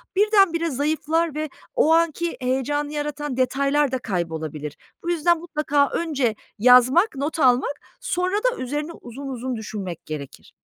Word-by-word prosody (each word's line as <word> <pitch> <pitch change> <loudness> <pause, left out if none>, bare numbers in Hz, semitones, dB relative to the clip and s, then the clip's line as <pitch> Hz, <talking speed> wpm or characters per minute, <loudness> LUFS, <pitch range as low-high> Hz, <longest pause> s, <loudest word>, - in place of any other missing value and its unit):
birdenbire 390 -5 +3
zayıflar 310 +3 0
ve 305 -1 -2 0.3
o 325 -10 +4
anki 335 0 +1
heyecanı 290 +3 -1
yaratan 295 -2 -3
detaylarda 275 +1 +1
kaybolabilir. 160 - -4 0.3
Bu 345 - -3
yüzden 345 0 +3
mutlaka 300 -4 +1
önce 275 -9 0 0.2
yazmak, 255 - +6
not 295 +4 -3
almak, 255 +1 +3 0.2
sonra 365 -3 -1
da - - +1
üzerine 295 +5 -3
uzun 275 -2 -9
uzun 255 -1 -4
düşünmek 200 -6 -6
gerekir. 145 -3 -8
290 Hz, 130 wpm, -23 LUFS, 250-330 Hz, 0.3 s, yazmak